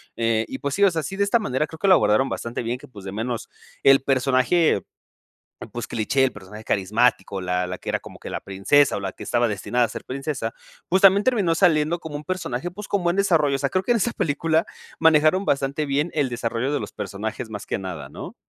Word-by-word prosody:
Eh, 115 -1 +1
y 130 - -5
pues 140 0 -2
sí, 200 - +2
o 195 - +6
sea, 165 -1 -1
sí, 195 - -5
de 200 - +1
esta 205 +4 +2
manera, 150 - -1
creo 160 - -11
que 195 - +1
lo 190 - +8
abordaron 105 +4 +3
bastante 120 +1 -4
bien, 120 +2 -2
que - - -14
pues, 100 -6 -12
de 95 - -5
menos 115 +3 -4 0.3
el 135 0 +6
personaje, 135 - +2 0.9
pues, - - -5
cliché, 135 +5 +1
el 130 - +2
personaje 105 +2 -11
carismático, 100 0 +1
la 90 0 -1
la 90 - -5
que - - -7
era - - 0
como - - -13
que - - -8
la - - -3
princesa, 100 +9 +2
o - - -3
la 95 -1 -4
que - - -11
estaba 120 -1 +1
destinada 120 +4 0
a - - -6
ser - - -8
princesa. 130 -3 -4 0.4
Pues, 190 +2 +3
también 200 +1 +6
terminó 200 -10 +2
saliendo 165 -2 +3
como 160 -3 -8
un 145 - -5
personaje, 175 -3 -3
pues, 210 +3 -8
con 200 -3 -1
buen 175 +1 +1
desarrollo. 165 -8 +3
O - - -2
sea, 140 0 0
creo 185 0 0
que - - 0
en 235 - +4
esa 235 +3 0
película 160 +2 +1 0.3
manejaron 160 +4 +4
bastante 140 +2 0
bien 145 +4 0
el 145 -4 +1
desarrollo 120 +3 -2
de - - 0
los 105 - -6
personajes, 110 +3 -5
más 105 -2 -7
que - - -2
nada, 85 -8 -6
¿no? - - -9
135 Hz, 235 wpm, -23 LUFS, 115-165 Hz, 0.9 s, lo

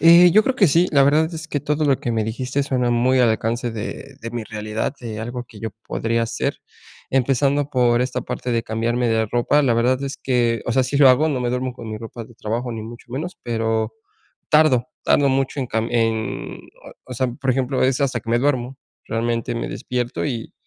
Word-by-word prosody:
Eh, 170 +2 +8
yo 215 - +6
creo 265 - 0
que 200 - +5
sí. 170 +5 +4
La 140 -2 +6
verdad 155 +4 +3
es 160 -1 -7
que 145 - -2
todo 150 +2 0
lo 140 -3 +3
que 120 - -2
me 110 -1 0
dijiste 125 +5 -2
suena 125 -3 0
muy 125 +2 +3
al 125 -2 +5
alcance 115 +2 -1
de 115 +5 -7
de 115 0 -6
mi 120 -1 -4
realidad, 110 +4 -3
de 110 -3 -5
algo 120 +2 -5
que 115 -3 -15
yo 110 - -4 0.2
podría 115 +1 0
hacer. 115 - -2 0.5
Empezando 135 +2 +2
por 120 -2 +3
esta 130 - -2
parte 125 - -4
de 115 -1 +1
cambiarme 120 +2 -1
de 110 -1 +1
ropa, 120 +7 +2
la 120 -4 +3
verdad 125 +3 +2
es 140 -1 -4
que, 120 -4 +1
o 120 - 0
sea, 130 - +3
sí 130 +3 -2
lo 140 -1 +7
hago, 135 +5 +4
no 135 -4 -1
me 120 -1 0
duermo 125 +1 -2
con 120 -2 -9
mi 110 0 -5
ropa 115 0 -8
de 120 - -17
trabajo 120 +3 -3
ni 110 -1 -5
mucho 115 +2 -10
menos, 155 +8 -4
pero 115 -1 -1 0.6
tardo, 150 -5 +4 0.2
tardo 140 -1 +4
mucho 135 +1 0
en 130 - -2
cam 115 -1 -1
en 115 -2 -1 0.2
o - - -12 0.2
o - - -5
sea, 130 +2 0
por 130 +2 -2
ejemplo, 130 +1 0
es 130 +1 +1
hasta 130 -4 0
que 115 - -6
me 120 - +3
duermo. 130 -1 0 0.3
Realmente 115 0 -1
me 115 - -3
despierto 125 -1 -3
y, 120 -5 -4
125 Hz, 225 wpm, -21 LUFS, 115-135 Hz, 0.6 s, Eh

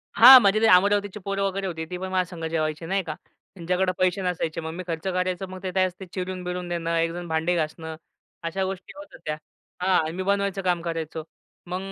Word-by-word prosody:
हां. 255 +2 +11
म्हणजे 205 +2 +4
ते - - +5
अमरावतीची 205 +2 +4
पोरं 195 0 -1
वगैरे 195 0 -1
होती, 160 -2 -4
ती 180 +2 -6
पण 190 +1 -5
माझ्यासंग 180 -3 -2
जेवायची 155 0 -2
नाही 195 +3 0
का. 155 -2 -5 0.4
त्यांच्याकडे 185 +1 0
पैसे 185 +1 +2
नसायचे 170 -3 -2
मग 160 0 -5
मी 185 +1 -6
खर्च 165 -2 -3
करायचो. 185 0 -1
मग 185 0 -8
ते 185 - -2
त्यावेळेस 185 0 -1
चिरून-बिरून 180 -1 -4
देणं, 170 -1 -1
एकजण 165 +1 -1
भांडी 160 +2 0
घासणं, 160 0 -3 0.5
अशा 165 +4 -2
गोष्टी 190 -1 -6
होत 295 0 -11
होत्या. 150 0 -5 0.4
हां, 180 -4 +2
मी 185 - -2
बनवायचं 200 0 0
काम 180 -2 +1
करायचो. 165 -2 -4 0.4
मग 185 +2 -4
180 Hz, 190 wpm, -25 LUFS, 165-190 Hz, 0.5 s, हां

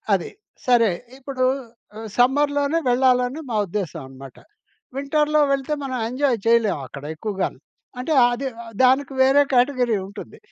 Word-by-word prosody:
అది. 180 - -4 0.4
సరే. 230 -5 +4 0.3
ఇప్పుడు, 270 -1 -4 0.7
సమ్మర్‌లోనే 285 +4 +2
వెళ్ళాలని 250 +2 +2
మా - - -1
ఉద్దేశ్యం 175 -4 -4
అనమాట. 135 0 -12 0.6
వింటర్‌లో 300 +2 +1
వెళితే 275 +2 -1
మనం 260 - -3
ఎంజాయ్ 260 0 +1
చేయలేమక్కడ 150 - +1
ఎక్కువగాను. 195 -5 -3 0.4
అంటే 310 +5 -1 0.2
అది 255 +3 -3 0.4
దానికి 265 +2 +3
వేరే 270 +2 +5
కేటగిరీ 245 -3 +2
ఉంటుంది. 200 +1 -10
250 Hz, 115 wpm, -22 LUFS, 215-275 Hz, 0.7 s, వేరే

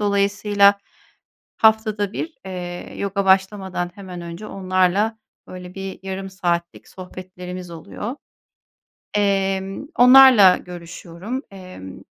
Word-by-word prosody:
Dolayısıyla 200 0 +3 0.8
haftada 215 -2 +2
1 320 - -5
eee, 180 -2 -7
yoga 200 0 -2
başlamadan 190 -2 +1
hemen 185 -3 -9
önce 170 +5 -8
onlarla 190 +3 0 0.3
böyle 180 0 -10
bir 195 0 -6
yarım 190 0 -5
saatlik 175 -3 -3
sohbetlerimiz 180 -1 -9
oluyor. 205 - -7 1.0
Emm, 195 +2 0
onlarla 250 -7 +8
görüşüyorum. 180 - -8
Emm, 185 - -11
190 Hz, 95 wpm, -21 LUFS, 180-205 Hz, 1.0 s, onlarla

